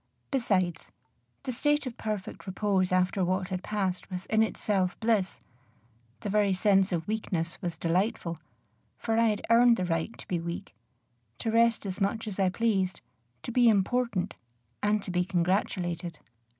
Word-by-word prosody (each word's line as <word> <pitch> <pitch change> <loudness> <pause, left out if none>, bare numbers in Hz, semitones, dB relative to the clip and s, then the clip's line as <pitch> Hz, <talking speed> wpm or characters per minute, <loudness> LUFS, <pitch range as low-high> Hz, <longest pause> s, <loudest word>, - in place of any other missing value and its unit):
Besides, 190 - +1 0.6
the 255 - -2
state 295 +4 +1
of 250 -2 -5
perfect 210 -2 -5
repose 190 -1 +1
after 185 +1 +2
what 185 +1 0
had 185 -1 -3
passed 195 -3 -2
was 185 -1 -5
in 220 0 +2
itself 195 -4 0
bliss; 220 -5 +1 0.8
the 205 - -3
very 205 -2 +3
sense 195 0 +3
of 170 -2 -2
weakness 180 -6 -2
was 175 -3 -3
delightful, 170 0 0 0.6
for 225 0 0
I 230 - +5
had 210 -2 -1
earned 235 0 +6
the 185 - -1
right 165 +5 -2
to - - -11
be 175 - -1
weak, 170 - -5 0.6
to 225 - -2
rest 230 -1 +3
as 195 +1 -4
much 220 +3 0
as 205 -2 -4
I 190 -1 +4
pleased, 195 -3 0 0.4
to - - -4
be 240 0 +5
important, 205 -2 +1 0.5
and 210 0 +1
to - - -4
be 180 0 +2
congratulated. 175 -2 -1
195 Hz, 160 wpm, -29 LUFS, 180-220 Hz, 0.8 s, earned